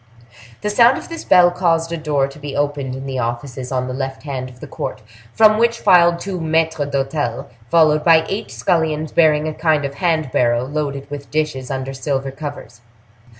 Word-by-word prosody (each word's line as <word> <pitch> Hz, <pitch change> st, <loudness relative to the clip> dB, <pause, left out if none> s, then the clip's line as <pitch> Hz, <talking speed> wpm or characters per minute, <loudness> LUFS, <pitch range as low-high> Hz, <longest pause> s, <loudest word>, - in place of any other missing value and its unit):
The 210 Hz, -, -1 dB
sound 235 Hz, +4 st, +5 dB
of -, -, -9 dB
this 330 Hz, -1 st, -6 dB
bell 175 Hz, -1 st, +5 dB
caused 165 Hz, -2 st, 0 dB
a -, -, -1 dB
door 150 Hz, -3 st, 0 dB
to 140 Hz, +2 st, -13 dB
be 145 Hz, -1 st, -6 dB
opened 145 Hz, -3 st, -2 dB
in 135 Hz, +1 st, -7 dB
the 135 Hz, -1 st, -3 dB
offices 125 Hz, +2 st, -4 dB
on 130 Hz, -1 st, -1 dB
the 130 Hz, -, -4 dB
left 135 Hz, 0 st, -5 dB
hand 130 Hz, -3 st, -5 dB
of 125 Hz, -1 st, -16 dB
the -, -, -8 dB
court, -, -, -6 dB, 0.3 s
from 215 Hz, -, +5 dB
which 235 Hz, 0 st, +2 dB
filed 175 Hz, -3 st, +5 dB
two 185 Hz, -2 st, -5 dB
maitres 160 Hz, -2 st, 0 dB
d'hotel 135 Hz, -3 st, -2 dB, 0.2 s
followed 155 Hz, -2 st, +4 dB
by 160 Hz, -1 st, +5 dB
eight 200 Hz, -, -4 dB
scullions 155 Hz, +5 st, -1 dB
bearing 155 Hz, -2 st, +3 dB
a 155 Hz, -, -3 dB
kind 155 Hz, -3 st, +1 dB
of 140 Hz, -, -4 dB
hand 155 Hz, -3 st, 0 dB
barrow 120 Hz, 0 st, +1 dB
loaded 140 Hz, -1 st, -4 dB
with 140 Hz, -1 st, -7 dB
dishes 150 Hz, -4 st, -2 dB
under 135 Hz, 0 st, -4 dB
silver 135 Hz, 0 st, -3 dB
covers. 140 Hz, -5 st, -8 dB
145 Hz, 195 wpm, -19 LUFS, 135-165 Hz, 0.3 s, sound